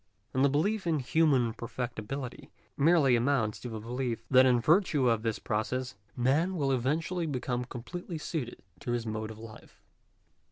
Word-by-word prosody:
And 130 - +2
the 140 - +5
belief 190 +8 0
in 160 -2 +2
human 135 -4 +2
perfectibility, 120 +2 -5 0.3
merely 145 -4 +4
amounts 120 -3 +1
to 125 - -6
the 110 -1 -5
belief, 120 +1 -3
that 130 0 +7
in 125 -1 +4
virtue 150 - +3
of 115 -2 +2
this 115 -1 -1
process, 125 +4 -2 0.2
man 145 +9 +2
will, 140 -5 0
eventually 160 +7 0
become 125 -3 -2
completely 165 +8 -6
suited 150 -5 -5 0.2
to 120 - -3
his 120 -1 -2
mode 110 0 -3
of 110 - -9
life. 110 -1 -13
130 Hz, 160 wpm, -30 LUFS, 120-150 Hz, 0.3 s, that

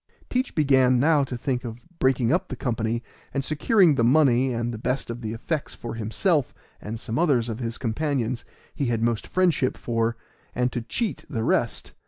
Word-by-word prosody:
Teach 255 +1 -1
began 130 -4 +4
now 150 +1 +4
to 130 -2 -4
think 125 +1 -2
of 120 0 -8
breaking 130 -1 +3
up 185 +2 +1
the - - -5
company 115 -2 -1 0.3
and 140 - 0
securing 165 - +4
the 120 - +1
money 130 -1 +4
and 120 0 -2
the 110 - -6
best 125 +1 -2
of 120 +1 -7
the 110 -2 -3
effects 145 +7 -3
for 120 - -6
himself 120 - 0 0.3
and 110 +2 -5
some 115 +5 -3
others 130 -9 +2
of 115 +1 -4
his 115 -1 -3
companions 125 -1 -1 0.3
he 140 - -1
had 115 -1 0
most 115 -2 0
friendship 175 -8 +2
for, 115 0 -1 0.4
and 125 0 +1
to 120 - -2
cheat 215 - -3
the 115 -7 -2
rest. - - 0
125 Hz, 190 wpm, -25 LUFS, 115-145 Hz, 0.4 s, began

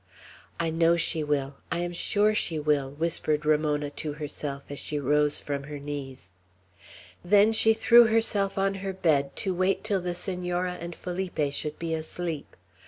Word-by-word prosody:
"I 165 -1 0
know 165 +1 +3
she 160 -1 +1
will! 140 -2 -1
I - - 0
am 175 0 -3
sure 210 +4 +2
she 170 -6 +1
will!" 145 -3 +1
whispered 155 0 -1
Ramona 150 -1 +1
to 150 0 -4
herself 145 -2 -5
as 145 - -5
she 150 - -3
rose 145 +1 +2
from 140 -1 -4
her 145 0 -7
knees. 135 -9 -7 0.9
Then 205 +4 +5
she 220 0 +4
threw 235 +2 +7
herself 210 -3 +1
on 195 0 +1
her 195 -1 -3
bed, 145 -7 +1
to 190 - 0
wait 185 +2 0
till 205 -3 0
the 175 0 -3
Senora 180 -1 -2
and 170 0 -6
Felipe 175 -6 -3
should 150 +1 -3
be 165 -1 -3
asleep. 160 -1 -5
165 Hz, 170 wpm, -27 LUFS, 145-185 Hz, 0.9 s, threw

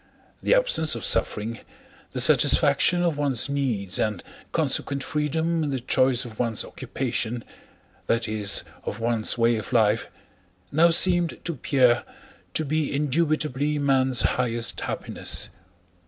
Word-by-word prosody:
The - - +3
absence 160 - +2
of 115 - -4
suffering, 115 +2 -1 0.5
the - - -4
satisfaction 175 -1 +4
of 165 -4 0
one's 140 -5 0
needs 120 -10 -1
and 105 -5 -1 0.3
consequent 140 -1 0
freedom 160 +2 -1
in 150 - -2
the 135 -2 -2
choice 130 +1 +2
of 110 -3 -11
one's 115 -3 -1
occupation, 120 -2 -3 0.6
that 115 0 0
is, 105 -2 0 0.2
of 105 - -5
one's 115 0 -1
way 115 0 +2
of 110 +1 -7
life, 110 -2 +2 0.6
now 165 +4 +4
seemed 175 0 +2
to 170 - -1
Pierre 125 -3 +2 0.5
to 155 - 0
be 155 +1 -1
indubitably 150 0 0
man's 130 -3 +2
highest 120 -2 0
happiness. - - -2
130 Hz, 130 wpm, -24 LUFS, 115-150 Hz, 0.6 s, satisfaction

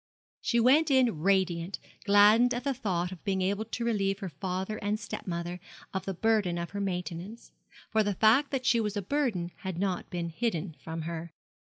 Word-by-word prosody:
She 235 - +1
went 285 +7 +5
in 255 - +3
radiant, 185 0 +1 0.3
gladdened 210 +4 +6
at 245 - -3
the 275 0 0
thought 185 -8 -2
of 185 - -10
being 190 -2 0
able 200 +3 0
to 235 +1 -4
relieve 195 -4 +1
her 195 -2 -5
father 190 +6 -3
and 210 +1 -1
step 205 -2 -7
mother 175 0 -3 0.3
of 190 -1 -3
the 195 - -2
burden 210 -4 +2
of 170 0 -4
her 200 - -3
maintenance; 180 +3 -4 0.4
for 220 - +3
the 205 -2 0
fact 230 +9 +4
that 265 -3 -2
she 235 -2 +4
was 210 -1 -2
a 200 - -2
burden 210 -8 -1
had 190 -3 -5
not 185 -1 -1
been 175 -2 -3
hidden 175 -3 -2
from 160 0 -5
her. 165 0 -5
195 Hz, 195 wpm, -29 LUFS, 175-225 Hz, 0.4 s, gladdened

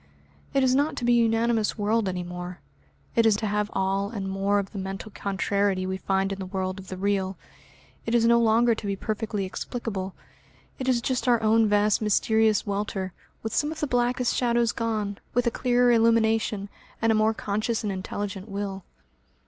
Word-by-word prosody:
It 270 - +4
is 255 -1 +3
not 285 +4 +2
to 240 - -3
be 240 0 +4
a - - +5
unanimous 225 -1 +1
world 215 0 +1
any 180 -1 -3
more, 180 +1 -7 0.6
it 230 - +5
is 215 - +4
to 215 - -3
have 210 0 0
all 195 +1 0
and 200 -4 -4
more 195 +1 +1
of 200 -1 -2
the 200 - -6
mental 195 +3 -6
contrariety 200 -1 0
we 190 0 -2
find 195 0 0
in 195 - -7
the 190 - -5
world 185 0 -3
of 190 - -11
the 185 - -6
real; 195 -1 -1 0.7
it 230 - +1
is 230 -1 +4
no 235 0 +5
longer 230 +1 +4
to 215 -2 -5
be 200 - -1
perfectly 215 0 -3
explicable, 195 -1 -5 0.6
it 260 0 -1
is 245 -2 +2
just 255 0 -1
our 240 -2 +4
own 220 0 +4
vast 205 +1 +3
mysterious 220 0 +2
welter, 200 -2 -3 0.3
with 220 -1 -3
some 295 +1 +1
of 315 - -7
the 300 - 0
blackest 245 -1 +1
shadows 235 -1 +2
gone, 215 -3 -2 0.2
with 245 0 +2
a 235 - +2
clearer 245 0 +3
illumination, 225 -3 +2 0.3
and 225 0 +2
a - - +4
more 215 0 +2
conscious 215 +3 -2
and 210 - -1
intelligent 195 +2 -5
will. 195 -1 -4
210 Hz, 195 wpm, -26 LUFS, 195-230 Hz, 0.7 s, a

